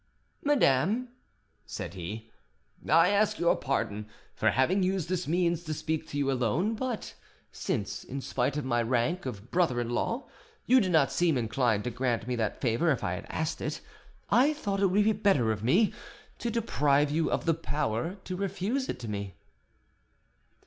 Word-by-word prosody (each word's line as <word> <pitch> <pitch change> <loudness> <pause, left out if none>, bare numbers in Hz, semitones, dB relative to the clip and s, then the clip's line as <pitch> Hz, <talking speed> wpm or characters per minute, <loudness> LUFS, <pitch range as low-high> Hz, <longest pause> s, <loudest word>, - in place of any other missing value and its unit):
"Madame," 235 - +2 0.5
said 85 - -6
he, 105 +5 -7 0.6
"I 165 +3 +6
ask 205 +1 +2
your 170 0 +3
pardon 110 -6 -2 0.3
for - - +2
having 170 +10 +2
used 185 -3 0
this 180 -1 -1
means 170 0 +1
to 155 -1 -3
speak 155 +1 -3
to 145 - -5
you 140 -1 +1
alone; 130 - +1
but 240 0 -4 0.4
since, 100 - -3
in 140 - -5
spite 140 +1 -1
of 150 - -2
my 120 -2 +1
rank 130 +8 0
of 110 -1 -7
brother 165 -9 +2
in 120 0 -2
law, 230 - -1 0.4
you 255 +1 +5
did 185 -3 0
not 155 -5 +4
seem 170 -5 +2
inclined 115 -2 +1
to 125 - -3
grant 120 0 -1
me 125 - -1
that 110 -2 -1
favour 120 +7 +1
if 135 - -1
I 90 - -1
had 90 - -6
asked 160 +1 -2
it, - - -3 0.5
I 275 +5 +5
thought 200 -9 -2
it 195 - +5
would 200 +3 +3
be 220 +1 +3
better 190 - +2
for 105 - -10
me, 185 - +3 0.5
to 235 - -2
deprive 150 -11 +2
you 160 +2 +1
of - - -1
the 165 - +4
power 150 - -2
to 185 - -5
refuse 200 +7 -2
it 125 -2 -4
me." 100 -3 -4
150 Hz, 175 wpm, -29 LUFS, 120-190 Hz, 0.6 s, I